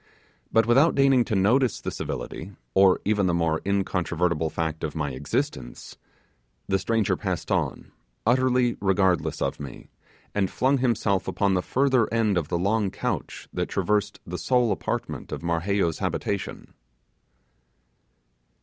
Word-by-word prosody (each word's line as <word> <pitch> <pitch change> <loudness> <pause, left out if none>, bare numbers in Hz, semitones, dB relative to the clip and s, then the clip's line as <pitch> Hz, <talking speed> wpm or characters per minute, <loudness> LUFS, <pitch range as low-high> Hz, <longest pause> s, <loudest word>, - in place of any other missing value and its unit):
But 115 0 +4
without 135 +8 +4
deigning 135 -3 +4
to 110 - -1
notice 115 +5 +3
the - - -4
civility, 95 +5 -5 0.2
or 95 -1 +5
even 105 -2 +2
the 85 - +1
more 80 -2 +1
incontrovertible 90 -4 0
fact 80 -1 -3
of 80 - -3
my 75 -3 -2
existence, 65 -2 -4 0.7
the 95 0 +1
stranger 110 0 +1
passed - - -3
on, - - -1 0.3
utterly 125 0 +2
regardless 90 -6 +1
of - - -2
me, 70 - -9 0.4
and 95 -2 +1
flung 135 +1 +1
himself 110 -6 +1
upon 100 -2 +1
the 90 - +2
further 130 0 +2
end 110 -3 +2
of 85 -4 0
the 85 - -1
long 100 +3 +1
couch - - -4
that - - -2
traversed 105 0 0
the 90 +1 -5
sole 125 -3 +2
apartment 95 - -3
of - - -5
Marheyo's 85 +1 0
habitation. 100 -1 -3
100 Hz, 140 wpm, -25 LUFS, 85-115 Hz, 0.7 s, or